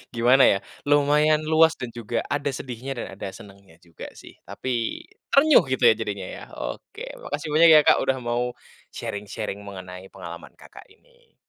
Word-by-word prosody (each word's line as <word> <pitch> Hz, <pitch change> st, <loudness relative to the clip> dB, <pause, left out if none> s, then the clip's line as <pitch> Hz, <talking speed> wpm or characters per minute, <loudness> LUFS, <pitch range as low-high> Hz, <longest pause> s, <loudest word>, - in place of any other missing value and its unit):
gimana 125 Hz, +3 st, +5 dB
ya, 100 Hz, -, +4 dB, 0.3 s
lumayan 150 Hz, +1 st, +3 dB
luas 160 Hz, +1 st, +4 dB
dan 125 Hz, -2 st, -7 dB
juga 115 Hz, 0 st, -3 dB
ada 145 Hz, 0 st, -1 dB
sedihnya 130 Hz, +2 st, -6 dB
dan 120 Hz, -, -5 dB
ada 100 Hz, -, -6 dB
senangnya 100 Hz, -4 st, -15 dB
juga 85 Hz, -2 st, -11 dB
sih, -, -, -15 dB
tapi, 120 Hz, -3 st, -3 dB, 0.3 s
terenyuh 300 Hz, +2 st, +6 dB
gitu 130 Hz, -1 st, -2 dB
ya -, -, +4 dB
jadinya 100 Hz, -4 st, -5 dB
ya, -, -, -9 dB
oke, -, -, -7 dB, 0.2 s
makasih 150 Hz, +1 st, -4 dB
banyak 160 Hz, +3 st, +6 dB
ya 150 Hz, -, +8 dB
Kak -, -, +5 dB
udah 135 Hz, -, +1 dB
mau, 120 Hz, +1 st, -2 dB, 0.4 s
sharing-sharing 105 Hz, 0 st, -5 dB
mengenai 95 Hz, -2 st, -10 dB
pengalaman -, -, -11 dB
Kakak -, -, -15 dB
ini. 485 Hz, -1 st, -27 dB
125 Hz, 160 wpm, -24 LUFS, 100-150 Hz, 0.4 s, ya